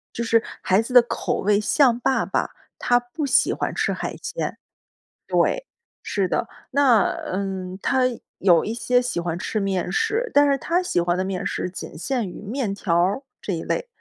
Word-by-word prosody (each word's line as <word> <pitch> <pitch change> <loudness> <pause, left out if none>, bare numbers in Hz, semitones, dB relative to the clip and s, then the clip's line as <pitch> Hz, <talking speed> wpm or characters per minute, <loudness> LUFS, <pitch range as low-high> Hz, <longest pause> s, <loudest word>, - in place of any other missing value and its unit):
就 235 - -2
是 230 0 +3 0.2
孩 190 +3 +3
子 250 +3 -7
的 245 - +10
口 - - -2
味 205 +1 +3
像 245 +1 +3
爸 260 +2 +1
爸， - - -1 0.3
他 245 0 +3
不 245 +6 -5
喜 275 - +3
欢 - - -2
吃 - - 0
海 - - -4
鲜， - - -3
对， - - -23 1.5
是 195 -3 0
的。 230 - -1 0.2
那， 255 -7 +5 0.3
嗯， 190 -1 -3
他 260 -1 +2 0.3
有 175 -4 +4
一 220 - -3
些 245 +1 +2
喜 245 -8 -2
欢 170 0 -2
吃 215 +3 -2
面 195 -3 -1
食， 450 +2 0
但 285 0 +6
是 275 - +3
他 345 +6 0
喜 180 - 0
欢 175 +1 0
的 185 - 0
面 190 -1 -3
食 - - -2
仅 185 - -8
限 230 - -2
于 - - -10
面 215 0 -2
条 175 -4 -1
儿 190 +9 +2 0.2
这 195 - -3
一 165 - -3
类。 - - -2
220 Hz, 205 characters per minute, -23 LUFS, 185-260 Hz, 1.5 s, 的